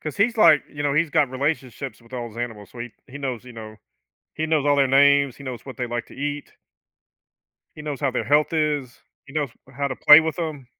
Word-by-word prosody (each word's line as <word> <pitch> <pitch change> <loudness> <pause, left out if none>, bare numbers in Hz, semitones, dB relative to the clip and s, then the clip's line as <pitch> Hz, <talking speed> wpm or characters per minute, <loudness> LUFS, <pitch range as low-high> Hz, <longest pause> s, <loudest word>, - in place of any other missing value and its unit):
'cause 155 - -6
he's 230 +4 +2
like, 165 -8 +6
you 145 0 -5
know, 145 -1 +1
he's 155 0 +1
got 140 -3 +2
relationships 135 -1 -3
with 115 +2 -21
all 120 -2 -4
those 115 +2 -12
animals, 110 -4 -6
so 120 - -13
he 120 -1 -6
he 140 +2 -10
knows, 130 -4 -4
you 125 - -11
know, 110 -1 -10 0.6
he 160 - -1
knows 155 -3 +1
all 145 0 +4
their 140 -1 +3
names, 140 0 +4
he 140 - -12
knows 130 -3 -7
what 130 -4 -9
they 125 - -2
like 120 0 -3
to - - -14
eat. 145 +1 -5 1.2
He 150 - -8
knows 150 -3 -5
how 140 -2 +1
their 125 - -2
health 150 +3 +2
is. 150 -5 -1 0.3
He 140 - -14
knows 150 -4 -1 0.3
how 140 - 0
to 130 - -4
play 150 +2 +9
with 160 +1 -3
them. 155 -6 -4
140 Hz, 240 wpm, -23 LUFS, 125-150 Hz, 1.2 s, play